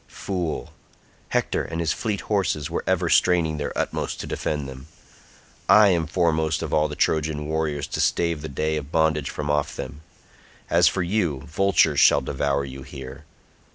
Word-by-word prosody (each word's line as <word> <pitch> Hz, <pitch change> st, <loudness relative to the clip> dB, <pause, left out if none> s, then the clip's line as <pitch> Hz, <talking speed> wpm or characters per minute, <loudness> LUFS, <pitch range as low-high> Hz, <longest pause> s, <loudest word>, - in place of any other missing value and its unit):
Fool; 90 Hz, -5 st, -4 dB, 0.6 s
Hector -, -, 0 dB
and 80 Hz, 0 st, -5 dB
his 85 Hz, -2 st, +1 dB
fleet 105 Hz, -3 st, -2 dB
horses 85 Hz, -7 st, -1 dB
were -, -, -2 dB
ever 95 Hz, -2 st, +1 dB
straining 85 Hz, -3 st, +3 dB
their 75 Hz, -, -3 dB
utmost -, -, -2 dB
to -, -, -6 dB
defend 75 Hz, -3 st, -3 dB
them. 65 Hz, +2 st, -10 dB, 0.8 s
I 105 Hz, -1 st, +7 dB
am 85 Hz, -4 st, +1 dB
foremost 80 Hz, -2 st, +1 dB
of 80 Hz, -, -4 dB
all 75 Hz, 0 st, +3 dB
the 75 Hz, -, -6 dB
Trojan 75 Hz, -1 st, 0 dB
warriors 75 Hz, -2 st, -1 dB
to -, -, -2 dB
stave 85 Hz, -3 st, +1 dB
the 80 Hz, -, -6 dB
day 75 Hz, +3 st, -1 dB
of 75 Hz, 0 st, -6 dB
bondage 80 Hz, -3 st, +1 dB
from 75 Hz, -1 st, -3 dB
off 75 Hz, -1 st, 0 dB
them; 70 Hz, +3 st, -7 dB, 0.7 s
as -, -, +5 dB
for 95 Hz, -, +1 dB
you, 85 Hz, -7 st, 0 dB
vultures 95 Hz, +5 st, +2 dB
shall 70 Hz, -, +6 dB
devour 70 Hz, +1 st, -1 dB
you 65 Hz, 0 st, -8 dB
here. 65 Hz, +2 st, -9 dB
80 Hz, 170 wpm, -24 LUFS, 75-85 Hz, 0.8 s, I